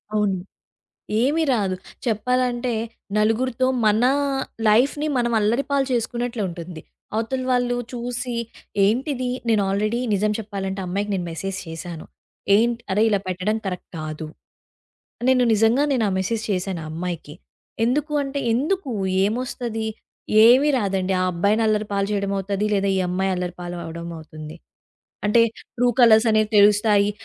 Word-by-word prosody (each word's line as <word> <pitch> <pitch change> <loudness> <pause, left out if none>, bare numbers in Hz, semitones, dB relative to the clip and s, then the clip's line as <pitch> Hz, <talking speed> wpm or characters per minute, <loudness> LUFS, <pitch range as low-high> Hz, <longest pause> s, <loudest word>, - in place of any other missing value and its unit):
అవును. 205 -3 +1 0.8
ఏమీ 295 +6 +2
రాదు. 195 -5 0 0.3
చెప్పాలంటే 245 +2 0 0.4
నలుగురితో 235 +4 +1 0.2
మన 215 +2 +3 0.6
లైఫ్‌ని 270 +8 +3
మనం 240 -1 +1
అల్లరిపాలు 270 +6 +1
చేసుకున్నట్లుంటుంది. 215 -9 -3 0.3
అవతల 240 +4 -1
వాళ్ళు 245 -1 +1 0.2
చూసి 245 0 -3 0.5
ఏంటిది 255 +4 0 0.2
నేను 220 -2 +3
ఆల్రెడీ 215 +4 0
నిజం 210 +1 +1
చెప్పాలంటే 195 -2 -4
ఆ - - -4
అమ్మాయికి 200 +3 -2
నేను 180 -2 -2
మెసేజ్ 190 +4 -4
చేశాను. 165 0 -7 0.5
ఏంట్ 235 +2 +2
అరే 200 +3 +2
ఇలా 205 -2 +2
పెట్టడం 185 +4 -1
కరెక్ట్ 180 -2 -5
కాదు. 155 0 -5 1.0
నేను 255 -1 +4
నిజంగా 225 +6 +3
నేను 235 -4 +1
ఆ - - -2
మెసేజ్ 220 +4 -1
చేశాను 185 -2 -2
ఆ - - -7
అమ్మాయికి. 165 -2 -5 0.5
ఎందుకు 295 +5 0
అంటే, 275 +1 -3
ఎందుకు? 295 +4 -1 0.3
ఏమొస్తది? 230 0 -3 0.6
ఏమీ 260 +5 +6
రాదండి. 195 -4 0
ఆ - - +2
అబ్బాయిని 200 +6 +1
అల్లరిపాలు 210 -2 0
చేయడమవుతుంది, 200 0 -1
లేదా 200 -1 +1
ఈ - - +1
అమ్మాయి 190 +2 0
అల్లరిపాలవడం 175 -2 -5
అవుతుంది. 155 0 -10 0.7
అంటే 210 +3 +5 0.3
ట్రూ 245 0 +2
కలర్స్ 230 -1 +6
అనేవి 215 -1 +2
తెలుస్తాయి. 205 0 +5
215 Hz, 125 wpm, -22 LUFS, 190-245 Hz, 1.0 s, ఏమీ